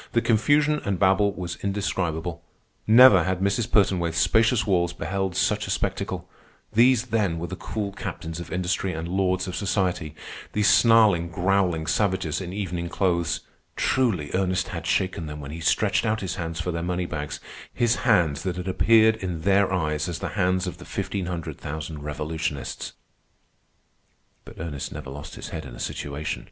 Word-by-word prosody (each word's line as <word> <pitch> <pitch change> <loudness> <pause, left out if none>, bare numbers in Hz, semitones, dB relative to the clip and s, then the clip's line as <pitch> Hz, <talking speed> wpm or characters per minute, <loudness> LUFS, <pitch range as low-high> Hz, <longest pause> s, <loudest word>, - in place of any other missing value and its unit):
The 115 - +4
confusion 145 +7 +3
and 100 -2 -1
babel 95 +2 +3
was 85 -3 -5
indescribable. 90 -4 -2 0.5
Never 110 -5 +8
had 95 0 -1
Mrs. 100 +4 0
Pertonwaithe's 90 -6 +2
spacious 110 +4 +3
walls 90 -4 +1
beheld 95 -1 -2
such - - +1
a - - -7
spectacle. - - -2 0.5
These, 120 +2 +4
then, 100 -7 +1
were 85 - -3
the 90 +2 -5
cool 100 +2 -4
captains 80 -3 -6
of 85 - -8
industry 90 +1 -1
and 80 +1 -4
lords 95 0 0
of 90 - -4
society, 90 -5 -1 0.4
these 105 -1 +2
snarling, 105 -5 +5
growling 90 -2 +1
savages 95 -4 0
in 90 -1 -5
evening 90 -3 -3
clothes. 85 -3 0 0.3
Truly 105 - +1
Ernest 95 -1 0
had - - -5
shaken 90 -4 0
them 75 0 -7
when 70 -1 -7
he 80 - -6
stretched 80 - +2
out 110 0 0
his 95 - -3
hands 80 -2 -4
for 90 - -2
their 85 0 -3
moneybags, 85 -4 -3 0.3
his 120 -1 +1
hands 80 -4 +2
that 90 0 -2
had 90 +1 -5
appeared 110 +3 +4
in 90 -6 -4
their 100 +2 +3
eyes 75 -2 -1
as 85 - -3
the - - -4
hands 95 -2 +1
of 90 - -6
the - - -11
fifteen 95 -4 -3
hundred 85 -4 -5
thousand 75 0 -6
revolutionists. 75 0 -4 1.5
But - - -12
Ernest 75 -4 -5
never 70 -3 -7
lost 75 +1 -8
his - - -7
head 80 - -5
in 65 -4 -9
a - - -11
situation. 75 +2 -4
90 Hz, 170 wpm, -25 LUFS, 80-100 Hz, 1.5 s, Never